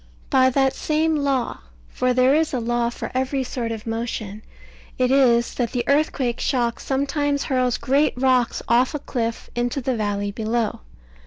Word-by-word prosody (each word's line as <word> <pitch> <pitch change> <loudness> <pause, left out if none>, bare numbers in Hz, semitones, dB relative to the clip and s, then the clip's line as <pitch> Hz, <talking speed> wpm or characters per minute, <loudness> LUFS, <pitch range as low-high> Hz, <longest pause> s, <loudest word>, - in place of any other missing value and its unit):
By 260 -2 +5
that 270 +1 +2
same 315 +3 0
law 275 -4 -1 0.3
(for 255 - 0
there 255 +2 +4
is 310 -2 +1
a - - 0
law 240 0 0
for 240 - -6
every 265 +1 0
sort 245 -2 -4
of 220 -2 -6
motion) 225 -2 -4 0.6
it 255 0 +2
is 240 -4 +3
that 240 -1 -2
the 245 -2 0
earthquake 280 -4 +1
shock 240 -3 0
sometimes 285 +1 -1
hurls 255 -2 +1
great 280 +3 +1
rocks 255 -2 +2
off 245 +5 +3
a - - -2
cliff 230 -4 -4
into 240 +3 -1
the 260 -1 -1
valley 205 -2 -2
below. 220 +1 -2
255 Hz, 165 wpm, -22 LUFS, 235-275 Hz, 0.6 s, By